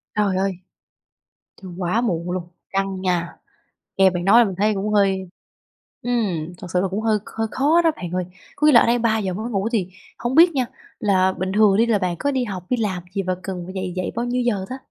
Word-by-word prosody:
Trời 205 -3 +1
ơi! 195 0 +1 1.1
Trời, 185 - -8
quá 180 +5 0
muộn 175 -7 -1
luôn, 180 -1 -4 0.2
căng 195 -1 -1
nha! 180 -2 -1 0.6
Nghe 190 -1 +6
bạn 175 -1 -3
nói 215 +5 +7
là 235 - +6
mình 190 - -4
thấy 210 +2 +2
cũng 205 +2 -2
hơi 190 -2 +2 0.7
ừm, 190 -9 -1
thật 180 - -9
sự 180 - +3
là 195 - +1
cũng 200 +4 -3
hơi 220 -1 +2
hơi 225 0 -3
khó 310 +6 +3
đó 330 - +3
bạn 175 -2 -6
ơi. 180 0 -1 0.3
Có 300 - +2
nghĩa 300 - +6
là 235 - +9
ở - - +2
đây 240 +1 +3
03:00 220 -5 0
mới 220 +6 -4
ngủ 200 +2 0
thì 195 -6 0 0.3
hông 240 +2 -2
biết 340 +2 +7
nha, 255 -3 +1 0.3
là 190 -3 +2
bình 190 0 -2
thường 210 -2 +5
đi 230 - +4
là 225 -3 +2
bạn 180 -2 -1
có 285 - 0
đi 260 -2 0
học, 190 -6 -5
đi 250 - +1
làm 190 -6 -2
gì 195 - 0
và 185 0 -1
cần 185 -1 -4
phải 185 - -8
dậy 185 -2 -4
dậy 185 - -2
bao 235 - -1
nhiêu 245 +1 0
giờ 210 -6 0
ta? 260 - -5
195 Hz, 240 wpm, -22 LUFS, 185-230 Hz, 1.1 s, là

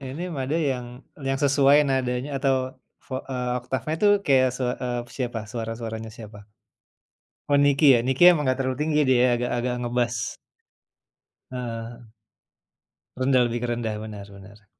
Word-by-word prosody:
inim 150 +7 -6
ada 145 +5 -1
yang 125 -1 -3 0.4
yang 135 - +1
sesuai 140 +1 +4
nadanya 130 +1 -1
atau 130 -1 0 0.3
vo 130 - -4
eee, 125 -2 -3
oktafnya 130 +4 -3
itu 210 - +4 0.2
kayak 130 -2 +4
se 130 - -2 0.2
eee, 120 -1 -2 0.2
siapa? 120 -3 -3
Suara-suaranya 115 -1 -5
siapa? 105 -2 -10 1.1
Oh, 145 - +5
Niki 145 +1 +4
ya, 120 - +3
Niki 130 +4 0
emang 150 -4 -1
nggak 130 - +1
terlalu 130 -1 -1
tinggi 150 -1 +1
dia 125 -1 +4
agak-agak 125 0 -1
ngebas. 120 -2 -2 1.2
Heeh. 120 -1 -6 1.1
Rendah, 130 -1 +3
lebih 120 0 -3
ke 120 - -2
rendah. 115 -2 -2
Benar 105 -2 -8
benar. 100 +2 -15
125 Hz, 140 wpm, -24 LUFS, 120-135 Hz, 1.2 s, Oh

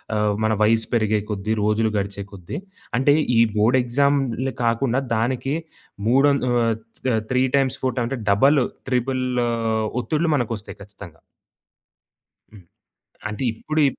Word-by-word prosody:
ఆహ్, 105 -1 +1
మన 110 0 +2
వయసు 115 +1 +2
పెరిగే 110 -2 +2
కొద్ది 105 +1 -2
రోజులు 105 +1 +2
గడిచే 100 0 -3
కొద్ది 90 -3 -7 0.4
అంటే 135 +3 +4 0.2
ఈ - - +6 0.2
బోర్డ్ 110 +5 +3
ఎక్సామ్‌లే 135 0 0
కాకుండా 120 +2 +1
దానికి 125 +4 -1 0.5
మూడొం 140 +4 +4
ఆహ్, 115 -2 +2 0.6
3 125 0 +3
టైమ్స్, 135 -2 +1
4 130 -2 0
టైమ్ 120 -2 0
అంటే 135 -1 -3
డబులు, 135 +7 +4 0.2
ట్రిబులూ 125 -1 0 0.5
ఒత్తిడులు 160 +5 0
మనకొస్తాయి 115 -7 -4
ఖచ్చితంగా. 100 -5 -13 1.3
హ్మ్. 105 -4 -15 0.7
అంటే 105 +3 -5
ఇప్పుడు 155 +7 -2
ఇప్ - - -7
120 Hz, 130 wpm, -22 LUFS, 105-135 Hz, 1.3 s, ఈ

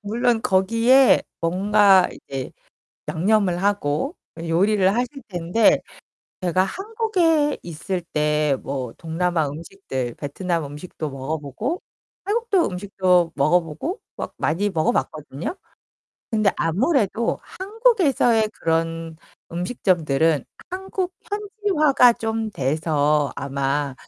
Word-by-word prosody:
물론 225 +2 0
거기에 230 +8 +4 0.2
뭔가 195 +2 +4
이제 135 -2 -7 0.6
양념을 185 0 +1
하고 205 - 0 0.2
요리를 185 +4 +2
하실 245 +2 0 0.2
텐데 180 +4 +3 0.6
제가 185 +1 +2
한국에 360 - 0
있을 175 +3 -4
때 150 -1 +2
뭐 130 -4 -4
동남아 165 -1 -1
음식들 140 -6 -5
베트남 165 +3 -3
음식도 150 +2 -6
먹어 135 +3 -4
보고 210 - -4 0.4
태국도 420 -3 +1
음식도 180 -2 +1
먹어 150 +5 +4
보고 165 - -5 0.2
막 - - -5
많이 200 +6 0
먹어 160 -5 +1
봤거든요? 155 - -3 0.8
근데 215 -4 +3
아무래도 225 - +1
한국에서의 375 - +2
그런 165 0 -2 0.4
음식점들은 165 - +1 0.3
한국 375 0 -3
현지화가 390 - +3
좀 225 -1 -2
돼서 150 -1 +1
아마 140 0 -1
185 Hz, 235 characters per minute, -22 LUFS, 155-240 Hz, 0.8 s, 거기에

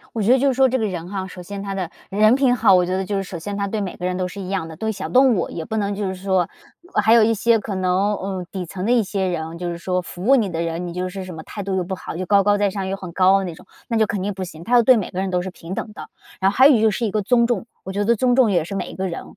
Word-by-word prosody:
我 225 - -1
觉 230 +5 +4
得 260 - +5
就 280 +2 +2
是 260 - +1
说 265 0 +4
这 260 - 0
个 225 - -1
人 175 -3 -5
哈， 190 -1 -4
首 180 - -10
先 200 +2 -7
他 200 -1 -4
的 185 -3 -3 0.2
人 215 +4 +4
品 260 -2 +3
好， 220 -4 +5
我 180 -1 +4
觉 185 +1 -1
得 190 - -1
就 200 +2 -2
是 195 - 0
首 180 -2 -7
先 200 +4 -5
他 200 -1 -1
对 215 +1 -2
每 190 -3 -4
个 180 - -7
人 180 0 -1
都 185 -1 -1
是 195 +3 -8
一 185 - -6
样 190 -4 -2
的， 160 - -9
对 220 +4 -2
小 210 - -5
动 255 -3 +5
物 175 - -1
也 165 - -5
不 220 - -4
能 205 -1 -1
就 205 -1 -3
是 190 - -3
说 190 -2 0 0.5
还 225 +1 +5
有 230 - +6
一 225 +1 +4
些 225 +1 +2
可 200 -2 -5
能 185 +3 +1
嗯， 190 -1 -4
底 185 -3 -5
层 185 +2 -6
的 230 - 0
一 240 -4 +4
些 190 -1 -1
人， 165 -1 -4
就 175 0 -4
是 170 - -5
说 180 +1 -1
服 175 +1 -8
务 270 - +6
你 215 -7 +2
的 165 0 -2
人， 165 +1 -3
你 - - -6
就 180 +1 -3
是 190 +1 -6
什 185 - -8
么 160 -1 -9
态 205 - -7
度 190 -1 -2
又 180 - 0
不 190 +1 -4
好、 165 - -7
又 185 0 -4
高 200 -1 +4
高 205 0 +2
在 205 -1 +2
上、 190 -1 -4
又 195 - -2
很 185 -3 -8
高 185 +1 +4
傲 - - +5
的 195 - -2
那 170 -3 -5
种， - - -16 0.2
那 230 - -1
就 220 - +4
肯 205 -2 -3
定 200 +1 -2
不 190 - -6
行， 170 -2 -8
他 240 - -5
要 240 - +7
对 255 +1 +6
每 205 - -2
个 185 - -3
人 190 -1 -2
都 180 -1 0
是 190 - -5
平 175 +2 -8
等 215 - -5
的。 - - -10 0.3
然 190 +1 +3
后 - - -7
还 260 +2 +7
有 260 -7 +6
就 220 -1 +4
是 230 +3 -1
一 - - -1
个 215 - 0
尊 235 +3 +3
重， 230 -4 -1 0.2
我 190 - -5
觉 205 +1 -1
得 235 +2 +3
尊 245 +2 +2
重 250 -4 +4
也 175 -5 +2
是 195 - -6
每 195 - -3
一 - - -9
个 190 0 -2
人， 170 - -5
195 Hz, 385 characters per minute, -21 LUFS, 180-215 Hz, 0.5 s, 要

